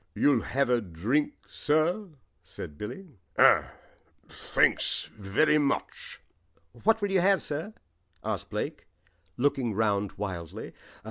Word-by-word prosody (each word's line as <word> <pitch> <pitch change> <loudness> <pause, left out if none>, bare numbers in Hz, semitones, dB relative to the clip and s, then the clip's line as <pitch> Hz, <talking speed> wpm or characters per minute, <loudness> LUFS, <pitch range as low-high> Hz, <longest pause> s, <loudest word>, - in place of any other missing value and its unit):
"You'll 140 -5 +3
have 140 0 0
a 120 -1 +3
drink, 105 - 0
sir?" 160 +7 +1 0.4
said 75 - -9
Billy. 170 - -7 0.3
"Oh, - - +6 0.6
thanks - - +1
very 130 +10 +2
much." 140 -2 -2 0.6
"What 225 0 +3
will 200 - 0
you 190 - +4
have, 195 +1 +3
sir?" 160 +9 -4 0.5
asked - - -3
Blake, - - -4 0.5
looking 125 -5 +1
round 105 -2 +1
wildly. 90 -5 -6
140 Hz, 115 wpm, -28 LUFS, 105-160 Hz, 0.6 s, Oh